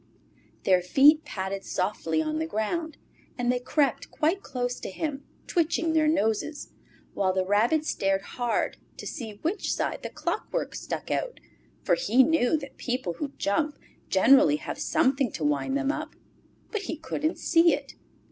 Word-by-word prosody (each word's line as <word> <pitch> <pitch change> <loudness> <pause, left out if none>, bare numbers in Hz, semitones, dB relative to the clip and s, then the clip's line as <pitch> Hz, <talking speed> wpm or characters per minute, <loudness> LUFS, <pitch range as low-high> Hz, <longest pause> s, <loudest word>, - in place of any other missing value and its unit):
Their 185 -2 +4
feet 285 - +5
padded 190 0 -4
softly 165 -4 -1
on 155 0 -2
the 160 - -1
ground, 290 - -2 0.4
and 245 -1 +1
they 250 - 0
crept 270 +1 0
quite 335 +6 0
close 245 -6 -3
to - - -5
him, 285 - -4 0.2
twitching 330 -1 +1
their 310 -1 +3
noses, 295 0 0 0.4
while 190 -2 +1
the 185 0 0
Rabbit 230 +11 +2
stared 195 -7 0
hard 240 +3 -1 0.2
to - - -8
see 230 -8 -5
which 365 +6 -1
side - - -2
the - - -5
clockwork - - -3
stuck - - -5
out, - - -2 0.4
for - - +2
he 265 - +4
knew 315 -1 +3
that 275 -3 -9
people 245 -8 -2
who 285 -2 -4
jump 295 +9 0 0.3
generally 190 - +6
have 155 - -6
something 275 -5 +2
to 155 - -4
wind 150 - +1
them 285 -1 +1
up. - - -6 0.6
But 430 - -2
he 325 - -2
couldn't 315 0 -2
see 335 0 +4
it. - - -10
265 Hz, 160 wpm, -27 LUFS, 200-310 Hz, 0.6 s, generally